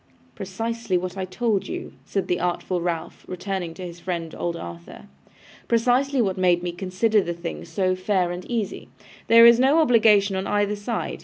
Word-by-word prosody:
'Precisely 225 - -3
what 180 +1 -4
I 190 -1 -3
told 205 +2 -1
you,' - - -6
said 195 - -2
the 180 - 0
artful 180 0 -2
Ralph, 170 -1 -4
turning 180 -3 -4
to 185 - -7
his 175 0 -9
friend, 170 -2 -4
old 170 -1 -3
Arthur. 85 - -9 0.6
'Precisely 250 +3 +2
what 190 -2 -2
made 175 -1 +3
me 175 - -2
consider 190 +4 +1
the 170 -2 -4
thing 170 0 -6
so 185 +3 0
fair 185 -1 0
and 175 +1 -6
easy. 230 -4 -3 0.4
There 230 0 +8
is 235 0 +7
no 270 +5 +4
obligation 220 -9 +4
on 190 +1 -2
either 205 0 +1
side. 210 +2 -4
190 Hz, 175 wpm, -23 LUFS, 175-225 Hz, 0.6 s, There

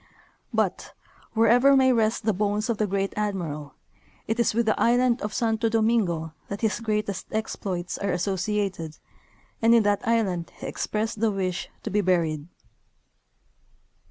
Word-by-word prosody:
But, - - -1 0.4
wherever 245 +5 +5
may 260 -1 +5
rest 220 -1 +1
the 220 - +3
bones 210 +3 0
of 220 - -3
the 215 - +2
Great 195 0 -1
Admiral, 165 -9 -3 0.5
it 225 +2 -2
is 235 - +2
with 235 0 +2
the 215 - +1
island 245 +1 +3
of 210 - -3
Santo 225 0 0
Domingo 215 -8 +1
that 200 - -5
his 220 -1 0
greatest 210 -4 -2
exj3loits 195 -5 -3
are 200 - +1
associated, 190 -2 -2 0.6
and 230 +1 +6
in 230 - +5
that 205 -1 +2
island 195 -7 0
he - - -8
expressed 220 0 -3
the 225 - +4
wish 185 -3 -2
to 220 - -4
be 210 +1 +2
buried. 165 -5 0
210 Hz, 150 wpm, -25 LUFS, 185-225 Hz, 0.6 s, and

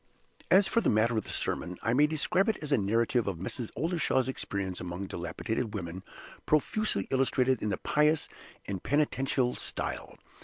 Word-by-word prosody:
As 195 +1 +6
for 230 - +2
the - - +2
matter 115 +2 +3
of 110 - -1
the - - -8
sermon, 90 +1 -2
I 115 - +1
may 145 +4 +5
describe 175 +6 +1
it 220 - +1
as 150 - -4
a 140 - +5
narrative 115 +3 +1
of 95 -4 -2
Mrs. 105 +6 -4
Oldershaw's 155 -3 +1
experience 100 -7 -3
among 90 +2 -4
dilapidated 105 +6 -3
women, 90 -1 -5 0.5
profusely 215 +8 +1
illustrated 130 -1 +2
in 105 - -1
the 100 - -1
pious 150 +1 +2 0.4
and 95 -3 -4
penitential 135 -3 +1
style. - - -4
125 Hz, 165 wpm, -30 LUFS, 100-150 Hz, 0.5 s, As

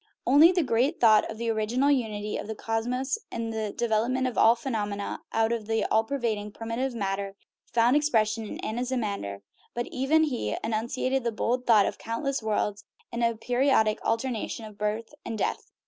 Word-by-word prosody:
Not 250 - +2
only 315 +5 +8
the 355 -2 +1
great 265 +5 +1
thought 220 -3 +5
of 220 - -6
the 230 0 -1
original 235 +6 +1
unity 215 -6 -1
of - - -4
the 220 - -4
cosmos 245 +5 -2
and 230 -1 -3
the 215 -2 -2
development 235 +4 0
of 255 - -2
all 230 +1 +6
phenomena 210 -5 -3
out 225 0 +2
of 225 -3 -2
the 225 0 +1
all 220 - +4
pervading 225 -5 -2
primitive 235 +3 -3
matter 195 -2 -2 0.4
found 235 +3 +4
expression 225 -7 +1
in - - -7
Anaximander, 215 - -3 0.3
but 240 0 -1
he - - -13
even 280 +5 +3 0.4
enunciated 235 +4 -1
the 235 - 0
bold 245 +3 -1
idea 210 -3 +6
of - - -5
countless 265 +5 -2
worlds 210 -1 -1 0.3
in 235 0 -3
a 230 -1 +2
peri 245 +4 0
odic 220 -5 +3
alternation 230 -1 -2
of 215 -1 -11
birth 210 +4 -3
and 225 - -4
death. - - -2
230 Hz, 180 wpm, -27 LUFS, 215-250 Hz, 0.4 s, only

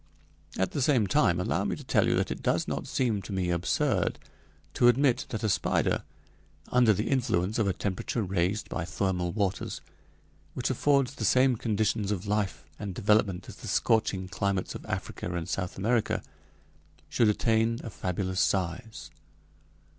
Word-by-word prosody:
At 95 - 0
the 145 - -2
same 125 -5 +3
time, 95 -6 +3
allow 90 - 0
me - - -1
to - - -10
tell - - +2
you - - +2
that - - 0
it - - -4
does - - +1
not - - -3
seem 115 -6 0
to 95 - -9
me 95 -2 0
absurd 85 +1 +1 0.6
to 120 - +4
admit 125 +1 +3
that 110 0 -4
a - - +2
spider, 100 - +1 0.7
under 125 -3 +5
the 105 +2 0
influence 110 -6 +1
of 110 - +2
a 95 - +1
temperature 100 +4 -2
raised 95 +2 -1
by - - -3
thermal 90 +1 -1
waters, 100 -2 -2 0.8
which 130 +1 -1
affords 140 0 +2
the 115 - -6
same 130 +4 +4
conditions 110 -2 0
of 100 -2 -2
life 100 -5 -1
and 100 -3 -5
development 100 -2 +2
as - - -10
the - - -9
scorching 100 -4 +1
climates 95 +1 -1
of - - -9
Africa 90 - -4
and 85 0 -3
South 90 0 -3
America, 110 +3 0 0.8
should 115 -3 +3
attain 115 +2 +2
a 115 - -6
fabulous 95 +1 -2
size. 95 +4 -2
105 Hz, 165 wpm, -28 LUFS, 95-115 Hz, 0.8 s, under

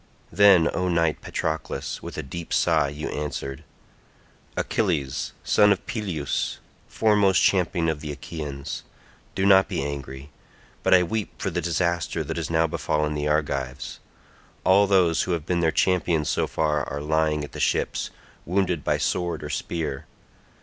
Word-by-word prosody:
Then, 100 -5 +6
O 90 - 0
knight 85 -3 +1
Patroclus, 80 -3 -3
with - - -8
a - - -3
deep 85 +5 -7
sigh - - +3
you 75 +2 -5
answered, 70 -2 -4 0.9
"Achilles, 80 -11 -1
son 105 -1 +5
of 100 - 0
Peleus, 90 - -2 0.3
foremost 105 -4 +3
champion 85 -3 +2
of 80 -2 -1
the 75 -1 -5
Achaeans, 70 -1 -6 0.5
do 95 - +1
not 95 -1 +6
be - - -2
angry, 70 0 -6 0.5
but - - +5
I 90 - +5
weep 105 +4 -3
for - - -2
the - - -1
disaster 85 0 0
that - - -5
has - - -3
now 80 0 +3
befallen 75 -1 -1
the 75 0 -2
Argives. 70 -3 -2 0.6
All 100 +2 +5
those 90 -4 +3
who 90 - -1
have 80 -3 -3
been 90 +1 0
their 80 -1 +2
champions 85 -4 +1
so - - +1
far 75 -2 0
are 70 - -3
lying 75 0 +1
at 75 - -7
the - - -8
ships, - - 0 0.3
wounded 90 -3 0
by - - +1
sword 85 -4 -1
or 75 - -5
spear. 80 -3 -3
80 Hz, 155 wpm, -25 LUFS, 75-90 Hz, 0.9 s, Then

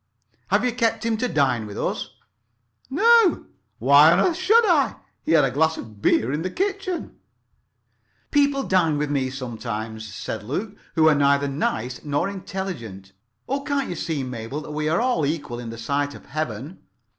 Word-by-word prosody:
"Have - - +2
you 250 - +2
kept 225 -2 0
him 230 -1 +1
to 250 +3 0
dine 130 - +1
with 100 - -8
us?" - - -3 0.7
"No. 445 - +4 0.3
Why 140 +6 +7
on 175 - +4
earth 345 - +2
should 430 +6 +4
I? 315 -9 +3 0.3
He 165 - 0
had 155 -4 +6
a 130 - -1
glass 160 +4 +1
of 105 -2 -10
beer 115 +3 +2
in 150 - -1
the 185 - -2
kitchen." 385 - -3 1.1
"People 285 -1 +2
dine 170 - +2
with 145 0 -1
me 135 -2 0
sometimes," 110 -4 -5
said 100 - -5
Luke, 185 - -4 0.2
"who 160 -1 +5
are 155 - +6
neither 140 0 +3
nice 125 -3 -2
nor 145 +5 0
intelligent. 175 - -6 0.4
Oh, 275 +1 -1
can't 280 -1 -1
you 175 - -3
see, 155 -4 -2
Mabel, 125 +3 -5
that 150 - -9
we 150 0 -1
are 165 - +2
all 245 -10 +1
equal 145 -5 -2
in 120 -1 -6
the 115 - -7
sight 140 +5 -2
of - - -13
Heaven?" 150 - -5
150 Hz, 180 wpm, -23 LUFS, -, 1.1 s, Why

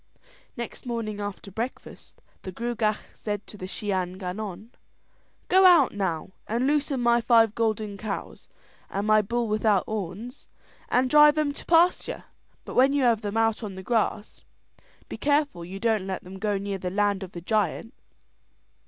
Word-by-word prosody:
Next 235 +1 -7
morning 220 -3 -3
after 205 -1 -6
breakfast 230 +6 -7 0.2
the 185 - -7
Gruagach 220 0 -1 0.2
said 205 -1 -5
to - - -13
the 185 -2 -7
Shee 205 +2 -4
an 185 -1 -2
Gannon: 200 +3 -6 0.8
"Go 380 +1 +5
out 345 -8 +6
now 190 -4 -2 0.2
and 235 +4 0
loosen 285 -1 +1
my 240 0 +3
five 230 -2 +4
golden 215 -3 -1
cows 200 0 -6 0.4
and 200 +1 -2
my 215 0 +5
bull 235 +3 -1
without 215 -2 +2
horns, 215 +3 -6 0.4
and 255 +1 +3
drive 295 +2 +7
them 300 -2 0
to - - -9
pasture; 340 +2 +3 0.4
but - - -7
when 265 +2 +4
you 285 -2 +2
have 230 -3 +3
them 205 0 -3
out 225 0 +2
on 205 -4 -6
the 190 - -8
grass, 220 -1 -1 0.7
be - - -7
careful 285 - +1
you 190 +3 -7
don't 220 -4 0
let 190 -1 -4
them 190 +1 -10
go 205 -1 0
near 200 0 -4
the 180 - -3
land 205 +1 +1
of 190 -1 -8
the 175 - -7
giant." 215 - -1
215 Hz, 170 wpm, -26 LUFS, 195-240 Hz, 0.8 s, drive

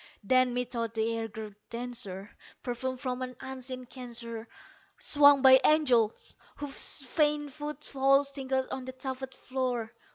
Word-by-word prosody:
Then, 255 +3 +3
methought 235 -2 -2
the 225 +1 0
air 225 0 -2
grew 215 -1 -8 0.2
denser, 230 -5 -6 0.3
perfumed 255 +1 -3
from 255 -1 -3
an 255 0 -4
unseen 255 -1 -6
censer 235 -2 -7 0.5
Swung 285 -2 +6
by 260 0 +9
angels 255 -8 +3 0.2
whose 290 0 0
faint 295 +1 +1
foot 300 0 -6
falls 275 +1 +3
tinkled 265 -1 -1
on 260 -1 -4
the 260 - -6
tufted 260 0 -5
floor. 250 -4 -2
255 Hz, 135 wpm, -30 LUFS, 235-270 Hz, 0.5 s, by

